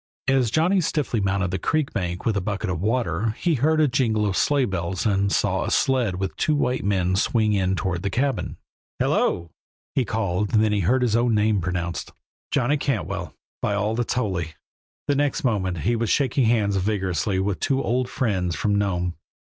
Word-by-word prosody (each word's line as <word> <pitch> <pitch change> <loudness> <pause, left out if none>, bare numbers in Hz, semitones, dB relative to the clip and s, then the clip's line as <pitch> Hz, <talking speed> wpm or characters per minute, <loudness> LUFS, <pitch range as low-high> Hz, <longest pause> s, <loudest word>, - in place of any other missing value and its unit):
As 135 -3 +3
Johnny 175 - +2
stiffly 150 -7 -1
mounted 95 -2 0
the 95 - -2
creek 155 - 0
bank 90 -4 -3
with 110 - +1
a 100 - 0
bucket 100 +1 -2
of 90 -2 -3
water 110 -1 0
he 175 - +1
heard 155 +4 +2
a 155 - +5
jingle 115 -5 +1
of 100 -2 0
sleighbells 95 - 0
and 100 -2 +2
saw - - +1
a - - -2
sled 125 -8 +1
with 95 +1 -3
two 155 - +1
white 125 -3 0
men 95 -2 +1
swing 110 +1 +2
in 95 -1 +1
toward 90 -1 -2
the 100 - -1
cabin. 130 +6 -1 0.4
"Hello!" 85 -1 0 0.4
he 130 - +2
called, 105 -3 -1
then 110 -1 +3
heard 125 +9 +2
his 115 -3 +2
own 120 -1 +2
name 105 -1 +2
pronounced. 85 -1 -3 0.4
"Johnny 135 +3 +1
Cantwell, 130 - -3 0.3
by 100 - 0
all 105 +2 0
that's 120 +1 -1
holy!" 95 -9 -2 0.5
The 145 - +3
next 145 0 0
moment 95 - 0
he 120 +8 +1
was 115 -1 -1
shaking 135 -2 +2
hands 105 -3 +2
vigorously 95 -2 0
with 95 -1 -1
two 135 0 0
old 125 +1 0
friends 95 - -1
from 105 - 0
Nome. 90 -3 0
105 Hz, 185 wpm, -24 LUFS, 95-125 Hz, 0.5 s, a